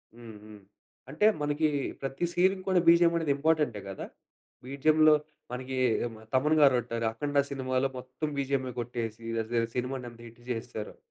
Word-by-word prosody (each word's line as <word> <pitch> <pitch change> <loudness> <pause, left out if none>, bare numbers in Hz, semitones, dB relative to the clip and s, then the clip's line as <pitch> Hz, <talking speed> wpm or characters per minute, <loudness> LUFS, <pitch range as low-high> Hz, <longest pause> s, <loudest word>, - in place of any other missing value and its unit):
హుహు, 110 -3 -12 0.6
అంటే 155 +9 +1 0.2
మనకి 150 +1 +1 0.3
ప్రతి 135 +5 -2
సీన్‌కి 185 +2 +2
‌కూడా 185 -1 +4
బీజీఎం 170 0 +6
అనేది 160 -4 +1
ఇంపార్టెంటే 150 -7 +1
కదా? 95 - -6 0.6
బీజీఎంలో 155 +3 +4 0.4
మనకి 130 +1 -4 0.3
ఎమ 115 -2 -6 0.2
తమన్ 150 +4 +3
గారుంట్టారు. 120 -4 +3
అఖండ 145 +4 -2
సినిమాలో 130 0 0
మొత్తం 130 +4 -5
బీజీఎమే 135 -2 -1
కొట్టేసి, 115 -1 -4 0.2
అజ 110 - -14 0.2
సినిమాని 125 0 -3
ఎంత 115 - -17
హిట్ 115 +1 -16
చేసేసారో. 110 -2 -5
130 Hz, 135 wpm, -29 LUFS, 120-150 Hz, 0.6 s, బీజీఎం